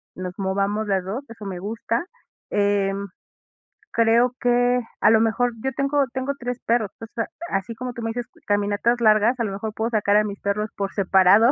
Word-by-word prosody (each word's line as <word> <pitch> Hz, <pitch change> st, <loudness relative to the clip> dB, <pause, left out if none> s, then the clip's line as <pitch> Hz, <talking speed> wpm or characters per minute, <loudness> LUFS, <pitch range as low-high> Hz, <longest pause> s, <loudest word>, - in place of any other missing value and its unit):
nos 180 Hz, 0 st, -5 dB
movamos 200 Hz, +2 st, 0 dB
las 195 Hz, -2 st, +1 dB
2 220 Hz, +10 st, -5 dB
eso 230 Hz, -2 st, -11 dB
me 185 Hz, -2 st, -5 dB
gusta. 230 Hz, -, -2 dB, 0.5 s
Em, 200 Hz, -1 st, +1 dB, 0.9 s
creo 235 Hz, +2 st, +4 dB
que 245 Hz, 0 st, +3 dB, 0.2 s
a -, -, +6 dB
lo 225 Hz, -, +6 dB
mejor 240 Hz, +2 st, +1 dB
yo 265 Hz, -, 0 dB
tengo 275 Hz, +2 st, +2 dB
tengo 265 Hz, +1 st, -1 dB
3 245 Hz, 0 st, -4 dB
perros, 230 Hz, -3 st, +2 dB
entonces 225 Hz, 0 st, -4 dB, 0.2 s
así 195 Hz, +4 st, -2 dB
como 250 Hz, +2 st, -5 dB
tú 235 Hz, -, -7 dB
me 225 Hz, -, -2 dB
dices 245 Hz, +1 st, -4 dB, 0.2 s
caminatas 205 Hz, +4 st, +1 dB
largas, 220 Hz, +3 st, +4 dB
a -, -, +1 dB
lo 210 Hz, -, -2 dB
mejor 215 Hz, +2 st, -4 dB
puedo 225 Hz, +1 st, -1 dB
sacar 210 Hz, -2 st, +3 dB
a 210 Hz, -, +4 dB
mis 200 Hz, -1 st, -5 dB
perros 210 Hz, +2 st, -1 dB
por 200 Hz, -1 st, -2 dB
separado 200 Hz, +4 st, +5 dB
220 Hz, 190 wpm, -23 LUFS, 200-240 Hz, 0.9 s, a